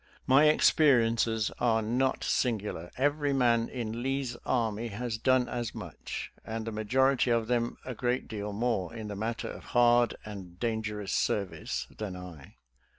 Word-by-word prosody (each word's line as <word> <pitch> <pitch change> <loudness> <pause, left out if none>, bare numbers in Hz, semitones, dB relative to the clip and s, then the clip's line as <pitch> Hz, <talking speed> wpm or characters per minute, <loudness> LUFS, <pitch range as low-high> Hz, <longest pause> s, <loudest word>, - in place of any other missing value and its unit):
My 135 +3 +6
experiences 115 -8 +4
are 115 -2 +2
not 125 +4 0
singular; 105 -8 -1
every 145 +1 +1
man 120 -3 +3
in 115 -2 -4
Lee's 135 -1 -1
army 115 -2 0
has 115 +1 -4
done 130 0 +3
as 120 -2 -4
much, 95 -7 -6
and 110 0 -4
the 115 - -3
majority 130 +5 +2
of 115 -1 +2
them 120 0 0
a 130 - -4
great 125 +2 -1
deal 105 -1 -4
more 105 -2 -1
in 110 -2 -6
the 105 - -4
matter 115 +3 -3
of - - -8
hard 120 -1 +5
and 95 -4 -9
dangerous 105 -3 -2
serv 100 -3 0
ice, - - -4
than 105 -4 -5
I. 90 -6 -10
115 Hz, 155 wpm, -30 LUFS, 105-125 Hz, -, My